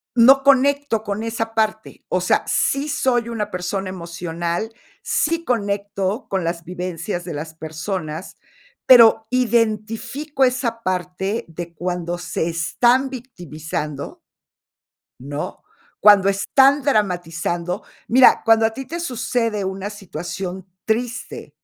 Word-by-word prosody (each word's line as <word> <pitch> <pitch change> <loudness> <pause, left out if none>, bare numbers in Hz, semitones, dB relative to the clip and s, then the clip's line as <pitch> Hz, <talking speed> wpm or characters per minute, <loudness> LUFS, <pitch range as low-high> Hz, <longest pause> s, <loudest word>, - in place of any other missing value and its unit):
no 265 +3 +7
conecto 280 -4 +3
con 205 0 -3
esa 225 0 -3
parte. 220 -1 -2
O - - +1
sea, - - +2
sí 275 +2 +1
soy 255 -6 +1
una 215 -3 -3
persona 185 +1 -3
emocional, 170 +3 -4 0.3
sí 330 +2 0
conecto 205 -1 -2
con 190 -3 -1
las 170 0 -3
vivencias 180 +1 -4
de 170 - -5
las 160 +2 -6
personas, 160 +1 -5 0.5
pero 225 -3 +7
identifico 235 +4 0
esa 245 -2 -1
parte 185 +3 -2
de 170 +1 -7
cuando 175 0 -3
se 170 -1 -3
están 240 +11 +2
victimizando 160 - -6 1.0
¿no?, 145 +3 -6 0.4
cuando 200 -2 +7
están 270 +8 +4
dramatizando 175 - -1 0.3
mira, 255 +2 +6
cuando 225 -1 +5
a 225 - -3
ti 270 - -6
te 335 +5 -5
sucede 230 - -1
una 190 +1 -4
situación 190 -1 -6 0.2
triste 235 +2 -3
205 Hz, 115 wpm, -21 LUFS, 175-240 Hz, 1.0 s, no